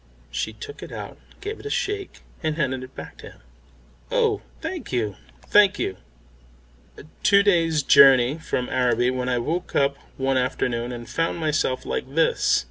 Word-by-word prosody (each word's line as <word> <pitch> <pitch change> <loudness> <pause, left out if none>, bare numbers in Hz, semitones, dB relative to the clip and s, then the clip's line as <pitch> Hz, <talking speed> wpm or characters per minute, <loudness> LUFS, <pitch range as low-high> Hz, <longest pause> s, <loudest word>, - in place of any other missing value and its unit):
She 110 - -3
took 435 - -10
it - - -9
out, - - -8 0.2
gave 420 +2 -5
it - - -13
a - - -4
shake, 410 -1 -3 0.2
and 155 -2 -1
handed 130 -4 -1
it 130 +1 -11
back - - -9
to - - -11
him. - - -23 0.7
"Oh, 460 -4 +1 0.2
thank 365 -4 -5
you, 110 -6 -1 0.3
thank 205 -1 +5
you 95 - -2 1.2
two 200 -1 +5
days' 165 -6 +2
journey 135 0 +6
from 125 -5 -2
Araby 125 -1 +2
when 130 0 -2
I 125 - +1
woke 165 +9 -3
up 140 0 +2 0.2
one 135 0 +1
afternoon 125 -1 -1
and 120 -1 -7
found 165 +1 -1
myself 155 -5 0
like 135 +2 -4
this. 165 - +3
140 Hz, 165 wpm, -24 LUFS, 125-175 Hz, 1.2 s, journey